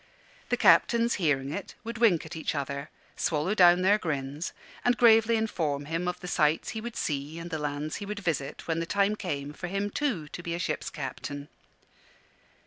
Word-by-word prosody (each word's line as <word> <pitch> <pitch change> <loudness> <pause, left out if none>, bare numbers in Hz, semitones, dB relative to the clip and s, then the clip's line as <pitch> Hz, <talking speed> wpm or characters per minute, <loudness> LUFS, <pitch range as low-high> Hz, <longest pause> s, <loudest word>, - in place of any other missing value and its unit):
The - - +2
captains, 235 0 +5
hearing 140 -4 +1
it, 200 +4 -6
would 230 0 -6
wink 200 -10 +4
at 160 - -8
each 160 -1 -2
other, 140 +1 -3 0.3
swallow 160 +5 0
down 180 -2 +6
their 205 +3 +5
grins, 145 -1 -3 0.3
and 245 -1 +3
gravely 225 0 +6
inform 155 -10 -1
him 165 +4 -2
of 180 - -2
the 180 - -6
sights 155 -3 +2
he 220 -2 -4
would 235 0 -6
see 145 +1 -2
and 170 +1 -7
the 160 - -2
lands 150 +1 -3
he 205 - -6
would 210 +1 -4
visit 155 -8 -3
when 165 0 0
the 165 - -3
time 200 +2 +2
came 145 -8 -4
for 175 - -6
him, 200 +2 -2
too, 215 - -1
to 175 - -7
be 170 -1 -3
a - - -3
ship's - - -2
captain. 145 0 -6
170 Hz, 195 wpm, -28 LUFS, 150-205 Hz, 0.3 s, down